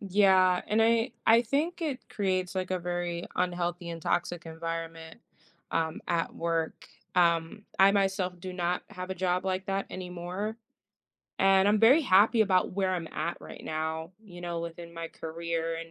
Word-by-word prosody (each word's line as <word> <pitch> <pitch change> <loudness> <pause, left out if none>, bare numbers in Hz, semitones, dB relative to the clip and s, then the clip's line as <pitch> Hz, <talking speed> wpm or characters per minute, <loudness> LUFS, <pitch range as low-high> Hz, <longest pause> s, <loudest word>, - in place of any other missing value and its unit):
yeah, 190 -2 +4
and 215 +1 +2
I 230 +2 +3 0.2
I 230 +2 +7
think 310 +9 -1
it 285 -5 -3
creates, 185 -3 -1
like, 185 -1 -2
a 185 - 0
very 175 0 -3
unhealthy 175 -1 -1
and 165 0 -6
toxic 175 +1 -1
environment, 165 0 -5 0.5
um, 160 -1 -1
at 170 -1 0
work. 165 -1 -2 0.3
Um, 170 +3 +2
I 195 +1 +8
myself 190 -3 0
do 185 +1 -6
not 180 0 -1
have 185 +1 -7
a - - -1
job 180 0 0
like 190 0 -1
that 195 0 -1
anymore, 180 +4 -5 0.8
and 195 0 +5
I'm 210 +1 +4
very 260 +8 +7
happy 220 0 +5
about 185 -3 +2
where 190 -1 0
I'm 170 -3 -4
at 170 - -3
right - - -10
now, 160 +2 -3
you 180 -5 -12
know, 170 -1 -3
within 170 0 -7
my 165 0 -5
career, 165 0 -3
and, 165 0 -9
180 Hz, 165 wpm, -29 LUFS, 170-195 Hz, 0.8 s, I